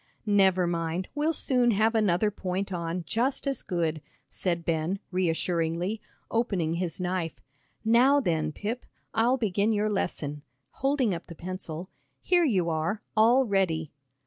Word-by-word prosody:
"Never 190 -3 +4
mind, 170 +1 -2
we'll 300 +2 +1
soon 250 -6 +3
have 220 +1 +3
another 210 -2 +2
point 190 0 -3
on, 170 0 -3
just 250 - 0
as 275 -3 -1
good," 165 -3 -1 0.3
said 170 -3 -2
Ben, 165 +3 0
reassuringly, 175 +2 0 0.3
opening 195 -9 0
his 170 -1 -2
knife. 180 -3 -2 0.5
"Now 250 +6 +5
then, 160 - 0
Pip, 220 +9 -5 0.3
I'll 240 +4 +3
begin 210 -1 +1
your 210 0 +1
lesson," 150 -7 -2 0.3
holding 270 -6 +1
up 170 - -6
the 170 - -9
pencil; 180 -1 -6 0.3
"here 355 -1 +3
you 190 - +2
are, 165 +6 -1
all 235 +5 +5
ready." 175 -7 0
185 Hz, 140 wpm, -28 LUFS, 170-225 Hz, 0.5 s, Now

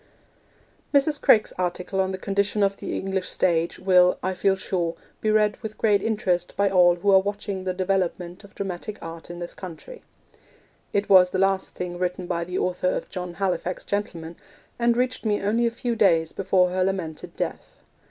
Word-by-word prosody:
Mrs. 280 +1 +3
Craik's 215 - +4
article 180 +2 -1
on 190 - 0
the 190 - -3
condition 200 +2 0
of 200 0 +1
the - - -4
English 190 -1 -2
stage 170 -2 0
will, 180 -1 +4
I 185 - 0
feel 190 +1 +2
sure, 175 -3 -2 0.3
be 215 - 0
read 215 -1 +3
with 215 -1 -7
great 205 -3 +3
interest 185 -5 -1
by 200 -1 +2
all 175 -2 +5
who 200 +3 +1
are 190 - +7
watching 200 -1 -4
the 185 - -1
development 185 -1 -2
of 200 - -16
dramatic 195 +2 -5
art 165 0 -8
in 175 - -7
this 175 0 -6
country. 185 - -10 0.9
It 200 0 0
was 185 -2 +7
the 185 - -2
last 195 0 +1
thing 175 -1 -5
written 180 0 -2
by 170 -1 -2
the 180 +1 -4
author 180 0 0
of - - -3
John 180 -2 -5
Halifax, 185 -2 -2
Gentleman, 170 -5 -4 0.4
and 235 0 +2
reached 255 0 -1
me 210 -2 +1
only 230 +4 +1
a - - +2
few 235 0 -3
days 165 -7 +3
before 185 -2 +2
her 185 0 +1
lamented 185 -5 -3
death. - - -5
190 Hz, 185 wpm, -24 LUFS, 180-205 Hz, 0.9 s, are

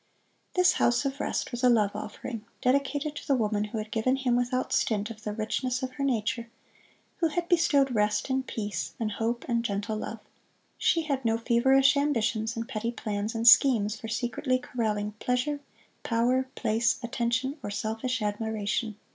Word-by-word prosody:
This 365 0 +5
"House 240 +3 +2
of 275 +1 -2
Rest" - - -2
was 240 0 -5
a 250 - +6
Love 210 -4 +3
Offering, 225 -4 -6 0.2
dedicated 280 +3 0
to - - -8
the 275 - +3
woman 210 -3 0
who 210 +2 -5
had 215 0 -5
given 245 +4 +1
him, 260 -3 +1
without 245 +1 0
stint, 215 0 +1
of 220 -1 -10
the 210 - -4
richness 250 +4 -2
of 260 - -2
her 275 - -4
nature; 235 -2 -1 0.7
who 330 - +2
had 340 +2 -2
bestowed 285 -7 +3
rest, 210 -1 +1
and 265 -1 -1
peace, 205 -5 -4
and 220 -2 -1
hope 230 +3 -2
and 235 -2 +1
gentle 210 0 -2
love. 225 - -5 0.6
She 330 -2 +2
had 280 -4 -2
no 225 -1 +2
feverish 265 +4 +4
ambitions 230 -6 0
and 230 0 -3
petty 230 +2 -2
plans 215 -1 -3
and 225 +1 0
schemes 230 -4 +6
for 225 - -8
secretly 240 +3 0
corralling 215 -4 -2
pleasure, 250 +4 0 0.4
power, 250 +3 +1
place, 230 +3 +1
attention, 240 +4 -1
or - - -5
selfish 220 +4 -2
admiration. 215 +1 -2
235 Hz, 170 wpm, -28 LUFS, 220-260 Hz, 0.7 s, a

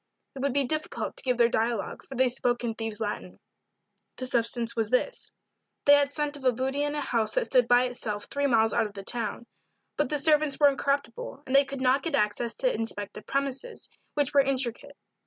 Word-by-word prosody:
It 270 - -9
would 280 +1 0
be 280 0 +3
difficult 310 +4 -2
to - - 0
give 250 -2 +1
their 235 -1 +5
dialogue, 230 -1 -1
for 270 - -10
they 260 +1 +3
spoke 245 0 0
in 230 -2 -1
thieves' 225 -1 -4
Latin. 210 -2 -4 0.8
The 255 - -4
substance 235 -1 0
was 225 -2 0
this: 255 - -1 0.5
They 285 - +8
had 285 -1 +4
scent 295 0 -2
of 285 - -10
a 255 - +4
booty 265 +4 -2
in 290 0 -1
a 295 - -1
house 225 -5 -1
that - - +2
stood 250 -3 +3
by 245 +1 +5
itself 225 -4 -4
three 285 0 -1
miles 225 -3 +3
out 220 - +2
of 205 - -15
the 195 - -7
town. 230 +1 -2 0.5
But - - +1
the 300 - +1
servants 300 -1 +3
were 290 -1 +7
incorruptible, 280 - -2
and 260 - -1
they 275 0 +6
could 275 -1 -6
not 260 +2 +3
get 330 - -1
access 220 +3 0
to - - +1
inspect 205 -3 -4
the - - -8
premises, 275 - -3 0.3
which 290 -2 0
were 280 - +7
intricate. 270 +1 -2
255 Hz, 215 wpm, -27 LUFS, 230-285 Hz, 0.8 s, They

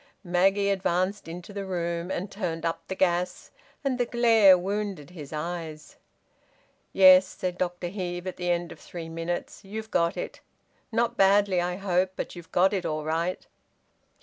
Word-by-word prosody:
Maggie 195 +3 +2
advanced 190 +1 0
into 175 +4 -8
the 200 0 -4
room 170 -2 -3
and 190 +1 -3
turned 170 -5 -3
up 165 0 -1
the 190 - -4
gas, 180 -1 0 0.3
and 265 -3 -1
the 245 - +2
glare 225 -6 +6
wounded 195 -4 -3
his 150 -6 -9
eyes. 155 -1 -6 0.9
"Yes," 185 0 +8
said 180 -1 -4
Dr 175 -1 -2
Heve, 175 -2 -4
at 185 - -5
the 180 -1 -2
end 175 0 0
of - - -11
three 165 -2 -8
minutes. 165 +1 -4
"You've 220 +3 -7
got 170 0 +1
it. - - -5 0.5
Not 235 +1 0
badly, 195 -1 +4
I 180 0 -1
hope. 185 -1 0
But - - -5
you've 175 -2 -11
got 190 +3 +3
it 190 -3 -1
all 155 0 -2
right." 165 +4 -2
180 Hz, 165 wpm, -27 LUFS, 170-195 Hz, 0.9 s, Yes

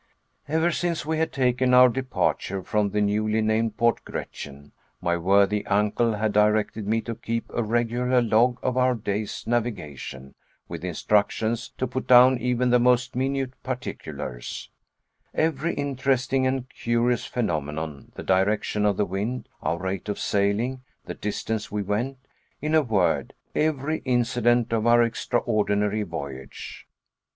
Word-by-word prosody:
Ever 160 +3 +2
since 170 -2 -1
we 160 0 -1
had 160 0 0
taken 125 -1 +2
our 125 0 +9
departure 125 -6 -1
from 105 +1 0
the 105 +1 0
newly 105 +1 +1
named 110 0 0
Port 115 0 +2
Gretchen, 70 0 -8 0.3
my 85 0 0
worthy 100 +4 +3
uncle 105 +3 +2
had 110 0 -1
directed 105 0 +2
me 115 +1 +1
to 115 - -5
keep 115 +1 -3
a - - -1
regular 120 +3 +1
log 120 +1 +3
of 130 0 0
our 125 0 +3
day's 105 -1 -3
navigation, 75 - -3 0.3
with 85 -1 -7
instructions 105 +6 0
to 130 - 0
put 130 +1 -4
down 125 0 +7
even 125 +1 +1
the 125 - +5
most 125 +1 +2
minute 135 0 -1
particulars, 125 - -6 0.6
every 160 +1 0
interesting 135 -1 0
and 130 -1 -1
curious 120 +1 0
phenomenon, 80 - -3
the - - -7
direction 105 +2 +1
of 100 -2 +1
the 105 - +2
wind, 105 +7 -3
our 85 - -1
rate 95 +2 -4
of 105 - -2
sailing, 105 +6 0 0.2
the - - -5
distance 110 +1 -3
we 105 0 -1
went; 115 +7 -2 0.4
in 150 +2 -2
a 160 - +6
word, 105 -9 0 0.2
every 155 0 0
incident 120 -2 +1
of 115 0 +1
our 120 0 +6
extraordinary 110 -3 0
voyage. 70 -8 -7
115 Hz, 145 wpm, -25 LUFS, 105-125 Hz, 0.6 s, our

